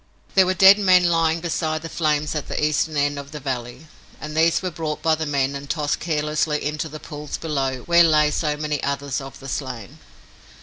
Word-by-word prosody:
There 190 -1 +5
were 185 - +1
dead 195 +3 +7
men 185 -3 +5
lying 165 -1 +2
beside 160 -2 -2
the - - -4
flames 150 -2 -1
at 150 -2 -4
the - - -3
Eastern 155 +1 0
end 145 0 0
of 140 0 -9
the 150 - -7
valley, 125 +1 -5 0.3
and 150 0 -7
these 165 +3 +3
were 185 - -2
brought 155 -2 -4
by 160 -1 +3
the 155 0 -2
men 140 -1 0
and 140 0 -7
tossed 150 -1 -1
carelessly 150 -2 -1
into 150 +2 -3
the 155 +1 -8
pools 150 -1 -7
below 135 -5 -2
where 170 0 +5
lay 150 -2 +4
so 150 -1 -1
many 150 -1 -2
others 140 0 -2
of 135 0 -10
the 135 - -10
slain. 130 -7 -6
150 Hz, 210 wpm, -22 LUFS, 140-160 Hz, 0.3 s, dead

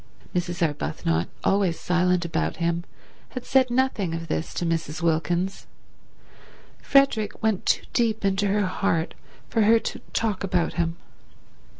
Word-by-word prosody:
Mrs. 175 -1 0
Arbuthnot, 85 - -1 0.2
always 195 -4 +2
silent 180 0 +2
about 170 - -1
him, 170 0 -1 0.4
had 255 -1 -7
said 260 -1 +3
nothing 240 -9 +1
of 165 0 -6
this 160 - -2
to 175 - -1
Mrs. 165 0 -2
Wilkins. 170 +3 0 1.1
Frederick 275 -8 +2
went 220 -4 +1
too - - +2
deep 220 -3 +1
into 195 +1 +2
her 205 +1 +2
heart 185 -2 0 0.3
for 225 - +1
her 220 +2 +6
to - - -4
talk 215 -4 -1
about 180 -3 0
him. 170 -1 -1
180 Hz, 135 wpm, -25 LUFS, 165-210 Hz, 1.1 s, her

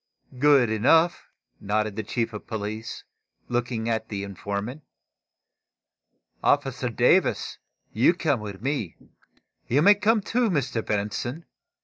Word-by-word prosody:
"Good 140 -5 +5
enough," 160 +10 +3 0.3
nodded 105 0 -1
the 110 - -2
chief 115 +1 -2
of 105 - -8
police, 110 0 -5 0.5
looking 120 -2 -2
at 110 -1 -1
the 100 -2 -4
informant. 100 - -5 1.6
"Officer - - +1
Davis, - - +2 0.3
you 125 +10 +4
come 155 -8 0
with 105 -1 -8
me. 130 - -2 0.7
You 145 +5 +3
may 205 +3 +8
come, 210 +2 +2
too, 235 +3 0
Mr. 130 - -1
Benson. 110 +9 -3
115 Hz, 115 wpm, -25 LUFS, 105-145 Hz, 1.6 s, may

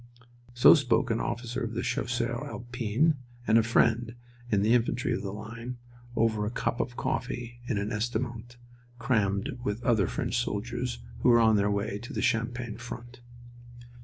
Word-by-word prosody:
So 120 - +9
spoke 125 -4 +2
an 115 - +1
officer 120 +1 -3
of 115 -1 -3
the 120 - -1
Chasseurs 120 0 -1
Alpins, 120 +5 0 0.3
and 110 0 +5
a - - +5
friend 115 +1 +2 0.4
in 100 -2 +3
the 110 +3 +4
infantry 120 +1 +1
of - - -2
the 100 - -4
line, 115 +4 -7 0.4
over 110 -2 +2
a 105 - -1
cup 120 0 -2
of 120 +1 -2
coffee 120 -2 -3
in 115 - 0
an 100 +1 -2
estaminet 120 +2 -3 0.4
crammed 115 +1 0
with 105 +1 -2
other 110 -7 +3
French - - -2
soldiers 120 +4 -3 0.2
who - - +3
were 120 -1 +7
on 110 -1 +5
their 100 0 +2
way 100 0 -1
to 120 - -9
the - - -2
Champagne 115 0 -1
front. 120 0 -9
120 Hz, 165 wpm, -29 LUFS, 110-120 Hz, 0.4 s, So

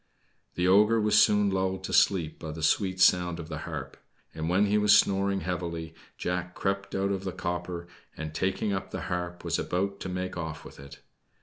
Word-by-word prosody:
The 90 +1 +1
ogre 105 +4 +5
was 105 0 +4
soon 105 -1 +4
lulled 95 0 -1
to - - -5
sleep 85 -6 +2
by 80 - -6
the 80 0 -7
sweet 95 +4 +1
sound 90 -2 +4
of 80 -1 -7
the 75 -1 -5
harp; 70 -4 -6 0.4
and 80 +1 -3
when 95 +4 +3
he 105 +1 +2
was 105 0 +6
snoring 100 0 +1
heavily, 85 -3 -4 0.2
Jack 90 0 -3
crept 100 0 -2
out 100 +1 0
of 95 -1 -2
the 95 - -3
copper, 85 0 -4 0.3
and 80 0 -5
taking 95 +4 -1
up 95 - -3
the - - -5
harp 90 0 -4
was - - -1
about 100 +2 -2
to 95 - -5
make 90 0 -4
off 80 -2 -5
with - - -12
it. 70 0 -12
90 Hz, 200 wpm, -28 LUFS, 85-100 Hz, 0.4 s, was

